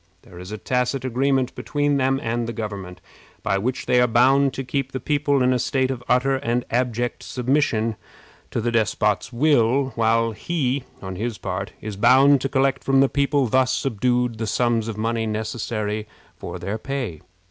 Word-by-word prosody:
There 90 - -13
is 90 +2 -9
a 110 - -4
tacit 125 +5 -1
agreement 130 +1 +1
between 145 -1 0
them 135 0 +1
and 115 +1 -1
the 115 - -4
government, 100 -5 -6 0.4
by 100 -1 +1
which 125 +5 -2
they 125 0 +3
are 125 - +4
bound 130 +4 +4
to 135 - -3
keep 135 +1 -2
the 130 - -2
people 145 0 +1
in 130 0 +3
a 125 - 0
state 130 +1 0
of 125 -2 -5
utter 135 +2 +3
and 125 -2 -1
abject 120 0 -1
submission 125 -4 0 0.5
to - - -2
the 120 +1 -1
despot's 105 -1 +1
will, 135 0 +3
while 115 0 +2
he, 135 0 -2 0.2
on 95 -1 -6
his 115 +1 -3
part, 90 -1 -4
is 105 -2 -6
bound 130 +5 +5
to 135 - -1
collect 135 0 +1
from 135 0 +3
the 135 0 +4
people 140 0 +1
thus 130 +2 +2
subdued 125 -2 0
the 110 - -2
sums 115 0 +1
of 110 -2 -5
money 115 +1 -1
necessary 110 -1 -3 0.3
for - - -7
their 100 +4 -4
pay. 125 - -4
125 Hz, 180 wpm, -23 LUFS, 110-135 Hz, 0.5 s, bound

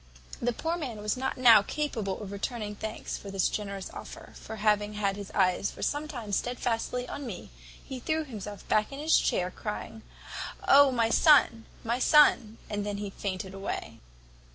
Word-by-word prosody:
"The 245 - +1
poor 325 +8 -2
man 260 -9 -5
was 210 0 -1
not 265 +1 -2
now 235 -4 +8
capable 220 -6 -3
of 195 - -7
returning 210 +1 -4
thanks 220 +1 -5
for 200 - -9
this 195 -2 +1
generous 200 -2 -5
offer; - - -10
for 220 - -8
having 210 0 +1
had 200 -2 0
his 200 -1 -7
eyes 185 0 +2
for - - -8
some 295 +1 -1
time 240 -8 -7
stedfastly 245 +2 -1
on 285 - -6
me, 185 - -8 0.3
he 265 -2 -6
threw 315 +5 -1
himself 210 -7 -8
back 215 +3 +2
in 275 - -7
his 310 +3 +3
chair, 180 0 0
crying, 220 +2 -6 0.7
`Oh, 280 0 +7
my 230 -2 +1
son! 270 -7 +5 0.2
my 235 +2 -1
son!' 260 -7 +5
and 205 -1 -3
then 205 -1 -4
fainted 190 -1 -4
away. 195 0 -5
220 Hz, 175 wpm, -29 LUFS, 200-255 Hz, 0.7 s, now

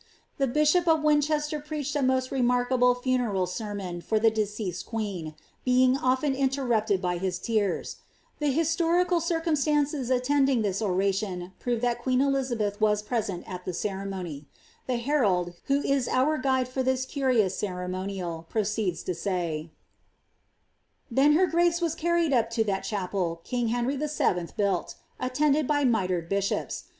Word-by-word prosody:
The 275 - +2
biibop 305 +6 +3
of 320 -2 +3
Winehealer 300 0 +1
peechri 300 -1 -4
n 275 -3 +2
moet 260 0 +2
renwriuible 250 -1 +2
fanenl 240 -8 +1
eermon 185 -2 -5
for 220 - +1
the 225 +1 +4
deeeeeed 210 -4 -3
uneeni 195 -9 -4 0.3
Ima^ 255 +1 +4
elbi 260 +2 +1
iotemipted 245 -7 +1
by 180 -2 -1
his 185 -1 -1
tears; 205 -1 -1 0.4
the 295 - 0
historical 335 +4 +2
circametancee 300 -5 0
attendiny 260 -1 +2
this 195 0 -1
on 190 -4 0
tioD 190 -2 -1
prove 240 -2 -1
that 240 -1 0
queen 255 0 +1
Elizabeth 255 -7 0
was 210 -1 +2
present 210 -5 -3
at 180 -1 -6
the 185 - -3
ceremony. 190 -7 -4 0.4
The 250 -2 0
herald, 210 -10 +1
who 280 +1 +1
is 275 -3 +1
our 290 +5 +2
guide 260 -1 +1
in 260 - +1
this 260 0 +1
curious 255 -9 +1
ceremonial, 180 -3 -4
proceeds 210 -5 -1
lo 180 - 0
say— 170 -3 -3 0.7
' - - -44
Then 275 +5 +4
her 360 +5 +5
grace 345 0 +2
was 335 -3 0
carried 340 -2 +1
up 230 -2 +2
lo 225 - +4
that 195 -3 -1
chapel 185 -4 -2
king 245 -2 -1
Henry 245 +4 0
VIL 300 +2 -1
boiided, 190 - -1 0.2
attended 290 +2 +1
by 290 -1 +2
mitred 185 -8 +1
bishops. 200 +1 -2
240 Hz, 150 wpm, -27 LUFS, 195-280 Hz, 0.7 s, her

